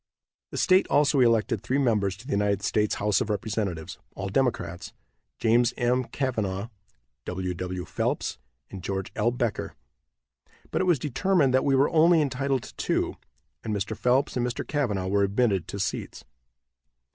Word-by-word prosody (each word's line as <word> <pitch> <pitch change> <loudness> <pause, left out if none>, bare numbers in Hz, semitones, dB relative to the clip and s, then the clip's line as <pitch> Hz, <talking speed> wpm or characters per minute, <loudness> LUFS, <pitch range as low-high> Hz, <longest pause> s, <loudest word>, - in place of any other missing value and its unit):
The - - -7
state 185 0 +4
also 145 -1 +3
elected 115 -3 +3
three 130 +5 0
members 105 -8 +1
to 115 - -14
the 145 - -6
United 100 -1 +1
States 105 +1 +1
house 105 0 +1
of - - -2
representatives, 100 -6 -3 0.2
all 100 0 -4
Democrats, 100 -7 -1 0.4
James 120 +1 +3
M. 125 +1 +1
Cavanaugh, 110 -7 -2 0.6
W. 90 0 -3
W. 90 0 -4
Phelps 60 - -2 0.3
and 95 - -7
George 95 +1 -3
L. 115 +2 +2
Becker, 120 -3 -2 1.0
but - - 0
it - - +1
was 175 -4 +4
determined 150 +1 +1
that 130 - +3
we 140 -1 +3
were 135 +2 +3
only 165 +1 +5
entitled 135 -2 0
to - - -11
two, - - -1 0.5
and 110 -2 -2
Mr. 105 +2 -2
Phelps 125 +5 +1
and 125 - 0
Mr. 125 +1 -3
Cavanaugh 110 -11 -1
were 100 +2 +1
admitted 100 -3 +1
to 100 +3 -6
seats. 95 - -3
115 Hz, 160 wpm, -26 LUFS, 100-130 Hz, 1.0 s, only